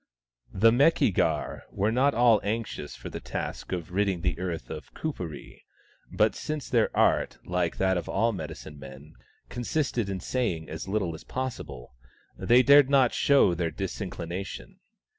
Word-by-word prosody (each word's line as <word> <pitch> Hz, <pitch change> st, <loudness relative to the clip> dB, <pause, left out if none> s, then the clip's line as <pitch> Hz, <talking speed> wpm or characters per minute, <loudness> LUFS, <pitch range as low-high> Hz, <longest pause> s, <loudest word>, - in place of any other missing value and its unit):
The 115 Hz, +4 st, +5 dB
Meki 140 Hz, -, +4 dB
gar 80 Hz, -4 st, -1 dB
were 105 Hz, +3 st, 0 dB
not 135 Hz, +4 st, +2 dB
at -, -, -3 dB
all 115 Hz, -3 st, +5 dB
anxious 105 Hz, -7 st, -4 dB
for -, -, -9 dB
the -, -, -5 dB
task -, -, -5 dB
of 90 Hz, -2 st, -4 dB
ridding 95 Hz, -2 st, 0 dB
the -, -, -1 dB
earth 85 Hz, -9 st, -4 dB
of -, -, -8 dB
Kuperee, 90 Hz, -, -6 dB, 0.5 s
but -, -, +2 dB
since 155 Hz, -2 st, -5 dB
their 115 Hz, -3 st, +3 dB
art, -, -, +2 dB
like 90 Hz, -2 st, -1 dB
that 95 Hz, -1 st, +2 dB
of 85 Hz, -, -4 dB
all 115 Hz, +4 st, +2 dB
medicine 80 Hz, -5 st, -8 dB
men, 70 Hz, +3 st, -12 dB, 0.3 s
consisted 120 Hz, -3 st, -2 dB
in 95 Hz, -1 st, -3 dB
saying 90 Hz, -, -2 dB
as 80 Hz, +3 st, -6 dB
little 95 Hz, -4 st, -1 dB
as 80 Hz, -, -10 dB
possible, 120 Hz, -, -6 dB, 0.4 s
they 125 Hz, +2 st, +4 dB
dared 140 Hz, +1 st, +7 dB
not 135 Hz, -4 st, +4 dB
show 140 Hz, -10 st, +4 dB
their 85 Hz, -1 st, -1 dB
dis 95 Hz, +6 st, -5 dB
inclination. 95 Hz, -, -6 dB
95 Hz, 160 wpm, -27 LUFS, 85-125 Hz, 0.5 s, dared